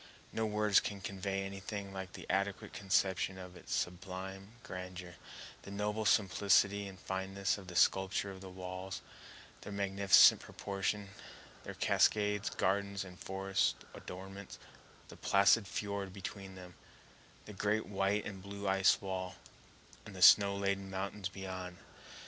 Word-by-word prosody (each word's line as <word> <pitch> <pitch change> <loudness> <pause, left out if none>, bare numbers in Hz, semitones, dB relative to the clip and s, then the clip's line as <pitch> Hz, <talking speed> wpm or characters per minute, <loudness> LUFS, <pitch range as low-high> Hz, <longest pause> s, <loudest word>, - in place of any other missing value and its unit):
No 110 0 0
words 105 -1 +4
can 100 -1 -4
convey 95 0 -3
anything 100 0 -6
like 95 -1 -7
an - - -9
adequate 100 +1 -1
conception 95 -1 +1
of 90 -1 -9
its 90 - -12
sublime 95 +3 -5
grandeur—the 90 +1 -9
noble 105 +2 -2
simplicity 100 0 +3
and 95 -1 -10
fineness 95 +2 -2
of 95 - -12
the 90 - -8
sculpture 95 +2 +2
of 95 -1 -10
the 95 - -8
walls; 95 0 -6 0.6
their - - -8
magnificent 100 -1 +6
proportions; 100 0 -3 0.5
their - - -7
cascades, 105 -1 +2
gardens, 100 +1 0
and 90 -1 -12
forest 95 0 0 0.2
adornments; 95 +2 -9 0.5
the - - -10
placid 100 +1 +4
fiord 100 -1 -3
between 95 0 -7
them; 90 -1 -11 0.7
the 105 - -9
great 105 +2 0
white 100 +1 0
and 95 -2 -6
blue 100 +1 -6
ice 95 0 +4
wall, 95 -1 -4 0.7
and 100 - -10
the 90 - 0
snow 100 +1 +8
laden 100 -1 -1
mountains 95 +1 -3
beyond. 95 -2 -6
95 Hz, 135 wpm, -34 LUFS, 95-100 Hz, 0.7 s, snow